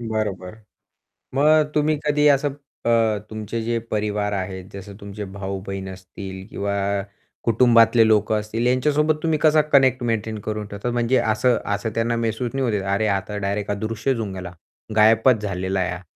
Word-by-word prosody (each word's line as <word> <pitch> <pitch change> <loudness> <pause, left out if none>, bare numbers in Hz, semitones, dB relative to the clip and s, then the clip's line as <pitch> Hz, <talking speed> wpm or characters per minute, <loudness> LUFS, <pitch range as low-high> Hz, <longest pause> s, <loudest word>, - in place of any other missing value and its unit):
बरोबर. 105 -5 -3 0.8
मग 150 +2 +4
तुम्ही 150 0 +2
कधी 150 0 +3
असं 140 0 +2 0.3
अ, 115 -2 +3
तुमचे 110 +1 -4
जे 115 +1 -1
परिवार 105 -1 -1
आहेत 95 -1 -4
जसं 100 +1 -9
तुमचे 100 +1 -7
भाऊ-बहीण 95 0 -5
असतील 95 +1 -9
किंवा 100 0 -3 0.7
कुटुंबातले 115 -1 +5
लोकं 110 0 +3
असतील 110 +3 -3
यांच्यासोबत 150 +4 +2
तुम्ही 160 -2 +1
कसा 155 0 +5
कनेक्ट 130 -2 +4
मेंटेन 110 -2 -2
करून 105 0 -4
ठेवतात 100 +4 -4
म्हणजे 120 +2 +1
असं 115 +2 +2 0.2
असं 100 +3 -3
त्यांना 115 +1 0
महसूस 115 +1 -2
नाही 135 -1 0
होत. 100 - -2
"अरे 110 +2 +1
आता 105 +2 -7
डायरेक्ट 100 0 -2
हा 100 - 0
अदृश्यचं 115 +4 -2
होऊन 105 -4 -4
गेला. 90 -2 -7 0.4
गायबचं 110 +2 +5
झालेला 95 0 -2
आहे 90 - 0
हा." 90 +1 -7
110 Hz, 160 wpm, -22 LUFS, 100-120 Hz, 0.8 s, कुटुंबातले